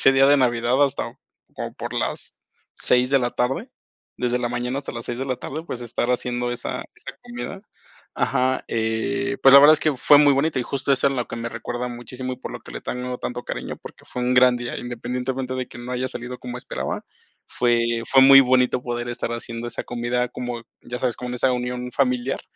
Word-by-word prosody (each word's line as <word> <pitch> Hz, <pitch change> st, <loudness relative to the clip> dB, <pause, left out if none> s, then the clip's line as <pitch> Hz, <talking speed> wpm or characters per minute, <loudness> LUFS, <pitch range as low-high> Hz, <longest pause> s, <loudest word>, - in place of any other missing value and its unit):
ese 135 Hz, -, +7 dB
día 135 Hz, 0 st, +5 dB
de 145 Hz, -, +6 dB
Navidad 125 Hz, +1 st, +2 dB
hasta 130 Hz, -4 st, -2 dB, 0.4 s
como -, -, -6 dB
por -, -, -6 dB
las -, -, -3 dB, 0.4 s
6 125 Hz, +1 st, +5 dB
de 140 Hz, -, +5 dB
la 120 Hz, -, 0 dB
tarde, 125 Hz, +2 st, -1 dB, 0.5 s
desde 125 Hz, 0 st, 0 dB
la 120 Hz, -1 st, -1 dB
mañana 125 Hz, +2 st, -2 dB
hasta 140 Hz, -, -6 dB
las 120 Hz, -1 st, -5 dB
6 120 Hz, 0 st, -4 dB
de 135 Hz, -, -3 dB
la 130 Hz, -, -1 dB
tarde, 150 Hz, +6 st, -6 dB
pues, 125 Hz, -, -5 dB
estar 120 Hz, +1 st, -2 dB
haciendo 120 Hz, 0 st, -1 dB
esa 120 Hz, -, -4 dB
esa -, -, -7 dB
comida. 120 Hz, +12 st, -7 dB, 0.5 s
Ajá, 130 Hz, +1 st, +1 dB
eh, 125 Hz, +4 st, -1 dB
pues, 135 Hz, -, +8 dB
la 140 Hz, -, +11 dB
verdad 150 Hz, +2 st, +9 dB
es 155 Hz, -, -2 dB
que 155 Hz, -1 st, +2 dB
fue 145 Hz, +3 st, +6 dB
muy 145 Hz, -1 st, +6 dB
bonito 145 Hz, +1 st, +1 dB
y 125 Hz, -, 0 dB
justo 140 Hz, +2 st, -1 dB
eso 135 Hz, -, +2 dB
es 135 Hz, -, -3 dB
lo 125 Hz, -2 st, -2 dB
que -, -, -6 dB
me 115 Hz, 0 st, -3 dB
recuerda 120 Hz, +2 st, -4 dB
muchísimo, 125 Hz, +1 st, -6 dB
y -, -, -17 dB
por -, -, -6 dB
lo -, -, -7 dB
que -, -, -12 dB
le -, -, -6 dB
tengo 125 Hz, 0 st, -4 dB
tanto 125 Hz, 0 st, -5 dB
cariño, -, -, -5 dB
porque -, -, -12 dB
fue 125 Hz, -, -5 dB
un 125 Hz, +1 st, +1 dB
gran 125 Hz, 0 st, +6 dB
día, 120 Hz, 0 st, -5 dB
independientemente 125 Hz, +2 st, -4 dB
de 130 Hz, -1 st, -3 dB
que 120 Hz, -, -11 dB
no 125 Hz, +1 st, -6 dB
haya 130 Hz, +1 st, -1 dB
salido 125 Hz, 0 st, -6 dB
como 125 Hz, 0 st, -6 dB
esperaba, -, -, -4 dB, 0.5 s
fue 120 Hz, -1 st, +1 dB
fue 135 Hz, -1 st, +7 dB
muy 135 Hz, 0 st, +10 dB
bonito 125 Hz, -1 st, +3 dB
poder 120 Hz, 0 st, -3 dB
estar 120 Hz, -1 st, -3 dB
haciendo 115 Hz, 0 st, -5 dB
esa 120 Hz, -, -5 dB
comida 120 Hz, +1 st, -1 dB
como, 120 Hz, -1 st, -5 dB, 0.2 s
ya 125 Hz, 0 st, -5 dB
sabes, 125 Hz, -3 st, 0 dB
con 125 Hz, 0 st, -5 dB
esa 130 Hz, +1 st, +2 dB
unión 125 Hz, 0 st, -3 dB
familiar, 125 Hz, 0 st, 0 dB
125 Hz, 220 wpm, -23 LUFS, 120-130 Hz, 0.5 s, la